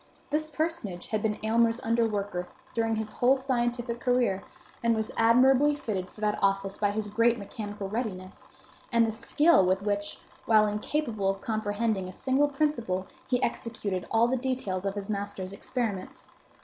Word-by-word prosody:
This 310 +1 0
personage 310 - -3
had 215 -1 -2
been 210 -1 0
Aylmer's 230 +1 +3
underworker 210 -5 0 0.3
during 225 -1 +1
his 215 -1 -3
whole 255 +2 +3
scientific 240 -2 -1
career, 245 -7 +1 0.4
and 230 -1 +3
was 220 0 -2
admirably 260 +5 +5
fitted 195 -9 -3
for 215 - -15
that 210 -1 +1
office 195 0 +1
by 205 - +2
his 210 +1 -2
great 230 +3 +3
mechanical 205 -1 -6
readiness, 195 -4 -5 0.4
and 235 -1 +4
the 225 - -1
skill 295 - +4
with 185 +2 +1
which, 205 0 -1 0.3
while 215 -1 +6
incapable 210 0 -1
of 195 0 -1
comprehending 215 -2 -1
a 185 - -8
single 265 +7 +2
principle, 250 -11 -1 0.2
he 250 0 +1
executed 210 -6 -2
all 230 +1 +4
the 260 +2 +1
details 240 -8 -2
of 195 - -2
his 200 -1 -4
master's 200 -2 -3
experiments. 220 -3 -4
220 Hz, 160 wpm, -28 LUFS, 200-245 Hz, 0.4 s, while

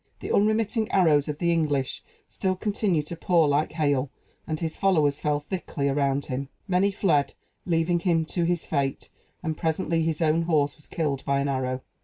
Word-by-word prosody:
The - - -5
unremitting 215 +1 +2
arrows 155 -6 +3
of 150 -1 -3
the 170 +1 +1
English 145 -5 0 0.3
still 190 -1 -1
continued 195 -5 0
to 170 - -6
pour 170 -1 +3
like 145 +2 +1
hail; 145 -4 +1 0.4
and 155 -1 -2
his 160 -2 -3
followers 155 -7 +2
fell 150 -1 0
thickly 150 -3 -3
around 140 0 +1
him. 135 +1 -4 0.2
Many 190 +1 +3
fled, 175 -8 +1 0.3
leaving 170 0 +2
him 170 -2 +1
to 170 +2 -2
his 175 0 0
fate; 135 -1 -2 0.3
and 160 -2 -2
presently 165 +1 0
his 160 -1 -1
own 160 0 +2
horse 150 -4 +1
was 150 - -16
killed 145 -5 -2
by 140 0 +1
an 140 - 0
arrow. 130 -1 -1
160 Hz, 180 wpm, -26 LUFS, 145-175 Hz, 0.4 s, arrows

